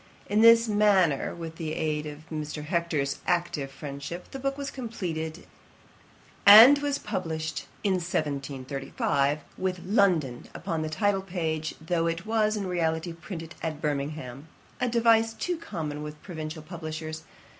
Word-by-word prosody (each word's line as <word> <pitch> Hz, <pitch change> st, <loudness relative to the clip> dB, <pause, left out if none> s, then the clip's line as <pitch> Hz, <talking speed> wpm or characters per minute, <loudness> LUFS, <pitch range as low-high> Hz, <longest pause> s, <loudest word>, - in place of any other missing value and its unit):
In 210 Hz, +2 st, +2 dB
this 230 Hz, 0 st, +7 dB
manner, 200 Hz, -10 st, +3 dB
with 165 Hz, -1 st, -7 dB
the 155 Hz, -2 st, -3 dB
aid 155 Hz, -1 st, -1 dB
of 150 Hz, +1 st, -9 dB
Mr. 150 Hz, -1 st, -4 dB
Hector's 155 Hz, -5 st, -1 dB
active 170 Hz, -5 st, 0 dB
friendship, 140 Hz, +5 st, -7 dB
the 270 Hz, -, -6 dB
book 275 Hz, +1 st, -2 dB
was 280 Hz, -1 st, -4 dB
completed, 175 Hz, -10 st, -5 dB, 1.0 s
and 225 Hz, +8 st, +10 dB
was 285 Hz, -1 st, 0 dB
published 160 Hz, -3 st, -4 dB, 0.2 s
in 200 Hz, -3 st, +2 dB
1735, 140 Hz, -2 st, -1 dB, 0.2 s
with 185 Hz, -1 st, -2 dB
LONDON 180 Hz, -, +2 dB
upon 165 Hz, -4 st, -3 dB
the 155 Hz, -, -2 dB
title 195 Hz, +5 st, +1 dB
page, 165 Hz, -4 st, -3 dB
though 165 Hz, +1 st, 0 dB
it 165 Hz, +1 st, -2 dB
was 215 Hz, -1 st, +1 dB
in 200 Hz, -, -2 dB
reality 165 Hz, -1 st, -1 dB
printed 165 Hz, -1 st, -8 dB
at 155 Hz, -2 st, -3 dB
Birmingham, 145 Hz, -2 st, -3 dB, 0.3 s
a 250 Hz, -, +1 dB
device 225 Hz, -1 st, +4 dB
too 355 Hz, -1 st, -2 dB
common 155 Hz, -, -5 dB
with 150 Hz, 0 st, -7 dB
provincial 155 Hz, -3 st, -6 dB
publishers. 155 Hz, -1 st, -6 dB
165 Hz, 140 wpm, -27 LUFS, 155-200 Hz, 1.0 s, and